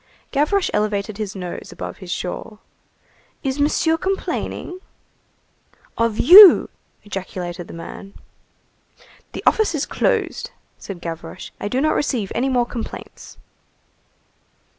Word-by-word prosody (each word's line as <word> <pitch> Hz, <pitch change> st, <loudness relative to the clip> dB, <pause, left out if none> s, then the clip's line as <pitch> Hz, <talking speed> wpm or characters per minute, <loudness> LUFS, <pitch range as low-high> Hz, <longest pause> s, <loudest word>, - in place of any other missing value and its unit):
Gavroche 305 Hz, +7 st, +1 dB
elevated 210 Hz, 0 st, -1 dB
his 205 Hz, -2 st, -4 dB
nose 180 Hz, -2 st, -7 dB
above -, -, -7 dB
his 185 Hz, -3 st, -11 dB
shawl. 180 Hz, +4 st, -5 dB, 0.9 s
"Is 270 Hz, 0 st, -2 dB
Monsieur 320 Hz, +2 st, +2 dB
complaining?" 370 Hz, 0 st, -3 dB, 1.2 s
"Of 230 Hz, -2 st, 0 dB
you!" 375 Hz, -, +9 dB, 0.3 s
ejaculated 180 Hz, -3 st, -6 dB
the -, -, -10 dB
man. 195 Hz, +4 st, -9 dB, 1.2 s
"The -, -, -6 dB
office 435 Hz, -6 st, +3 dB
is 285 Hz, -, -1 dB
closed," -, -, -1 dB, 0.3 s
said 185 Hz, -4 st, -8 dB
Gavroche, 165 Hz, +1 st, -7 dB
"I -, -, -3 dB
do 250 Hz, +5 st, -1 dB
not 310 Hz, +3 st, +2 dB
receive 240 Hz, -9 st, -1 dB
any 260 Hz, +3 st, 0 dB
more 245 Hz, -2 st, +2 dB
complaints." 235 Hz, -1 st, -8 dB
220 Hz, 115 wpm, -21 LUFS, 190-295 Hz, 1.2 s, you